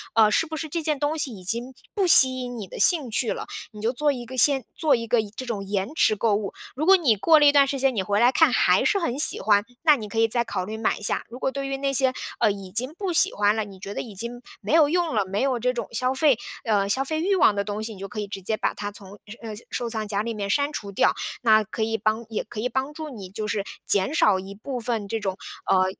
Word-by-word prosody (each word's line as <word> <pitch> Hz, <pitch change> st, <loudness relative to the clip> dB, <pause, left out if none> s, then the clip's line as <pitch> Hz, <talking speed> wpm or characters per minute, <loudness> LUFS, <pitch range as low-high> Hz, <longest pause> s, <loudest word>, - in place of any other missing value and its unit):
呃， 220 Hz, -2 st, +5 dB
是 325 Hz, -, +2 dB
不 320 Hz, 0 st, -7 dB
是 315 Hz, -, -4 dB
这 335 Hz, +3 st, -3 dB
件 305 Hz, -2 st, -1 dB
东 295 Hz, +3 st, -1 dB
西 280 Hz, -4 st, -2 dB
已 195 Hz, -5 st, -11 dB
经 235 Hz, +7 st, -2 dB, 0.2 s
不 400 Hz, -3 st, 0 dB
吸 260 Hz, -6 st, +9 dB
引 245 Hz, -1 st, -6 dB
你 205 Hz, -4 st, -7 dB
的 -, -, -10 dB
兴 310 Hz, -8 st, +4 dB
趣 225 Hz, +1 st, -1 dB
了， -, -, -7 dB, 0.3 s
你 210 Hz, -, -11 dB
就 225 Hz, +2 st, 0 dB
做 295 Hz, +3 st, +1 dB
一 245 Hz, -3 st, -6 dB
个 260 Hz, +2 st, -9 dB
先 270 Hz, +1 st, +5 dB
做 315 Hz, -3 st, +2 dB
一 230 Hz, -1 st, -5 dB
个 235 Hz, +1 st, +2 dB
延 210 Hz, -2 st, -10 dB
这 260 Hz, -, -6 dB
种 220 Hz, -5 st, -4 dB
延 195 Hz, +5 st, -3 dB
迟 220 Hz, -8 st, +3 dB
购 210 Hz, 0 st, +1 dB
物。 205 Hz, -1 st, -4 dB, 0.2 s
如 300 Hz, +4 st, -2 dB
果 385 Hz, +2 st, +7 dB
你 275 Hz, -11 st, +2 dB
过 310 Hz, +10 st, +4 dB
了 295 Hz, -, +4 dB
一 285 Hz, -, +7 dB
段 280 Hz, -1 st, +4 dB
时 275 Hz, 0 st, -3 dB
间， 265 Hz, -1 st, +1 dB
你 195 Hz, -, -1 dB
回 205 Hz, +2 st, 0 dB
来 240 Hz, +2 st, +5 dB
看 -, -, +4 dB
还 -, -, +3 dB
是 420 Hz, -2 st, +2 dB
很 255 Hz, -8 st, -2 dB
喜 300 Hz, -, +4 dB
欢， 205 Hz, -1 st, +3 dB, 0.2 s
那 305 Hz, -2 st, +6 dB
你 220 Hz, -6 st, -7 dB
可 225 Hz, +2 st, -3 dB
以 225 Hz, -, +4 dB
再 235 Hz, +1 st, 0 dB
考 185 Hz, -5 st, -4 dB
虑 215 Hz, +3 st, -6 dB
买 220 Hz, -, -1 dB
一 -, -, -13 dB
下。 210 Hz, -, 0 dB
如 245 Hz, +2 st, -10 dB
果 265 Hz, -, -1 dB
对 275 Hz, 0 st, -4 dB
于 275 Hz, 0 st, -3 dB
那 275 Hz, 0 st, -1 dB
些， 260 Hz, -1 st, +3 dB, 0.3 s
呃， 210 Hz, -, +3 dB
已 195 Hz, -2 st, -8 dB
经 250 Hz, +8 st, -1 dB
不 390 Hz, -2 st, -3 dB
喜 -, -, +4 dB
欢 205 Hz, +1 st, +2 dB
了， 220 Hz, -, -1 dB
你 195 Hz, -2 st, -12 dB
觉 195 Hz, +2 st, -7 dB
得 -, -, -4 dB
已 225 Hz, -, -10 dB
经 235 Hz, +4 st, -5 dB, 0.2 s
没 210 Hz, +6 st, -3 dB
有 320 Hz, -2 st, +6 dB
用 340 Hz, -4 st, 0 dB
了， 210 Hz, -2 st, +1 dB
没 195 Hz, +2 st, -3 dB
有 260 Hz, -2 st, 0 dB
这 250 Hz, +2 st, 0 dB
种 240 Hz, -, -5 dB
消 255 Hz, +3 st, 0 dB
费 270 Hz, -2 st, +3 dB, 0.3 s
呃， 205 Hz, -3 st, +1 dB
消 260 Hz, +7 st, 0 dB
费 315 Hz, +3 st, -3 dB
欲 390 Hz, +3 st, +1 dB
望 260 Hz, -, +4 dB
的 200 Hz, -, -1 dB
东 210 Hz, +1 st, -5 dB
西， 220 Hz, 0 st, -5 dB
你 -, -, -14 dB
就 195 Hz, -, -6 dB
可 215 Hz, -, -7 dB
以 205 Hz, -, -4 dB
直 195 Hz, -1 st, -7 dB
接 220 Hz, +4 st, -1 dB
把 -, -, -1 dB
它 205 Hz, 0 st, -5 dB
从 200 Hz, -1 st, -13 dB, 0.3 s
呃， 225 Hz, -2 st, -7 dB, 0.2 s
收 240 Hz, -2 st, -3 dB
藏 220 Hz, -2 st, -4 dB
夹 205 Hz, -1 st, -1 dB
里 230 Hz, +2 st, -4 dB
面 200 Hz, -1 st, -4 dB
删 285 Hz, +7 st, +1 dB
除 200 Hz, -8 st, -6 dB
掉， 195 Hz, -, +2 dB, 0.3 s
那 220 Hz, -2 st, +4 dB
可 215 Hz, +2 st, -7 dB
以 225 Hz, 0 st, -1 dB
帮 215 Hz, +2 st, -1 dB
也 220 Hz, -, -3 dB
可 220 Hz, -, -9 dB
以 245 Hz, +3 st, -1 dB
帮 265 Hz, +4 st, -3 dB
助 310 Hz, 0 st, -7 dB
你 205 Hz, -9 st, -9 dB
就 210 Hz, +3 st, -5 dB
是 205 Hz, -1 st, -2 dB, 0.2 s
减 200 Hz, +8 st, +2 dB
少 210 Hz, -, +3 dB
一 190 Hz, +1 st, -9 dB
部 250 Hz, +5 st, -6 dB
分 225 Hz, -3 st, -3 dB
这 225 Hz, +2 st, -3 dB
种， 190 Hz, -2 st, -4 dB, 0.3 s
呃， 185 Hz, 0 st, +4 dB
230 Hz, 315 characters per minute, -24 LUFS, 205-275 Hz, 0.3 s, 吸